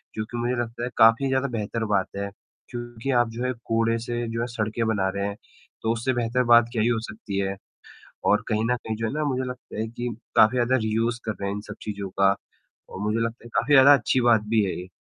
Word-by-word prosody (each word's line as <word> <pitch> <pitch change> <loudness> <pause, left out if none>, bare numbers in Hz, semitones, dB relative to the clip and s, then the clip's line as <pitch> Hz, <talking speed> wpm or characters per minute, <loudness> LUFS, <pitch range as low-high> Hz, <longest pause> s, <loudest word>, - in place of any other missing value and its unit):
जो 110 - -2
कि 120 - -4
मुझे 120 +1 0
लगता 120 0 -4
है 120 - -2
काफ़ी 115 +4 +6
ज़्यादा 130 +1 +1
बेहतर 110 +1 -2
बात 95 -2 +2
है 100 0 -3 0.4
क्योंकि 120 +1 -5
आप 120 - -1
जो 115 +2 -5
है, 125 - 0
कूड़े 115 0 +1
से 120 0 -3
जो 115 0 -2
है 120 - -1
सड़कें 115 -1 -2
बना 100 -4 +1
रहे 100 0 -1
हैं, 100 - -4 0.5
तो 110 - +1
उससे 120 +3 -1
बेहतर 120 +1 0
बात 120 0 +8
क्या 115 -3 0
ही 110 - +2
हो 120 -2 +2
सकती 100 -2 -6
है। 95 0 -1 0.7
और 105 - +3
कहीं 110 0 +1
न 125 - +2
कहीं 110 -2 -5
जो 115 +1 -2
है - - -3
ना 155 +1 -1
मुझे 130 -1 -1
लगता 125 -3 -8
है 110 - -1
कि 120 +2 -4 0.3
काफ़ी 110 +4 +6
ज़्यादा 125 +1 +3
रीयूज 115 +2 0
कर 110 - -1
रहे 100 - -2
हैं 100 - -2
इन - - -4
सब 105 - -6
चीज़ों 100 -2 -5
का 100 0 +5 0.5
और - - -8
मुझे 105 +2 0
लगता 115 +1 -3
है - - -10
काफ़ी 135 +6 +3
ज़्यादा 140 +1 +9
अच्छी 130 -1 +2
बात 120 -3 +4
भी 110 -1 +3
है 95 - -2
ये 90 - -7
115 Hz, 250 wpm, -25 LUFS, 110-120 Hz, 0.7 s, ज़्यादा